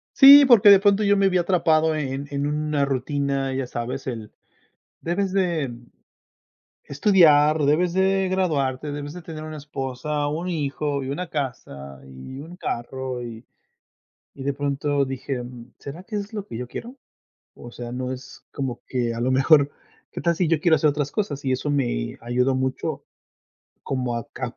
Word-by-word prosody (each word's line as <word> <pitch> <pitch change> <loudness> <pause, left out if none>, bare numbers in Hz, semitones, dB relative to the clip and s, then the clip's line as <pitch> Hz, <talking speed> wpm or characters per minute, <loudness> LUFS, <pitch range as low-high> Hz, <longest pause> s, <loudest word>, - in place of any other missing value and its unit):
Sí, 280 +1 +10
porque 230 -5 +7
de 200 -1 +9
pronto 200 +1 +3
yo 205 0 +4
me 195 0 +3
vi 185 - +1
atrapado 160 -3 +2
en 140 -1 -3
en 140 0 -2
una 150 0 0
rutina, 140 0 -1
ya 135 0 -2
sabes, 125 +2 -5
el 115 -4 -5 0.7
debes 185 +3 -1
de 170 -9 0 1.1
estudiar, 150 -2 +4
debes 165 +5 +2
de 190 +1 +2
graduarte, 150 -7 -1
debes 145 0 -6
de 180 - -9
tener 155 -1 -8
una 155 0 -7
esposa, 145 0 -4
un 160 +5 -3
hijo 145 -3 -2
y 130 - -4
una 175 +5 -4
casa 70 - -6
y 65 - -10
un 170 +4 -10
carro 130 -2 -4
y 115 -1 -8 0.9
y 135 - -9
de 140 - 0
pronto 140 0 0
dije: 130 -1 -4
"Mm, 120 0 -11
¿será 150 +6 -9
que 215 0 -5
es 205 +2 -5
lo 205 -2 -5
que 115 - -8
yo 125 - -5
quiero?" 240 - -8 0.6
O 120 - -11
sea, 120 -1 -7
no 125 +1 -3
es 130 0 -10
como 130 -4 -4
que 120 -3 -1
a 115 - -5
lo 125 +2 0
mejor: 140 +2 +4 0.4
"¿Qué - - -5
tal 170 0 +1
si 180 - +1
yo 165 -2 +2
quiero 160 -1 +4
hacer 155 - +3
otras 145 -1 -2
cosas?" 165 -10 -3
Y 135 - 0
eso 130 +3 -2
me 125 - -1
ayudó 125 +3 0
mucho 130 0 -3 0.8
como 125 -3 -2
a 115 - -5
cap 125 -2 -6
145 Hz, 175 wpm, -23 LUFS, 130-170 Hz, 1.1 s, Sí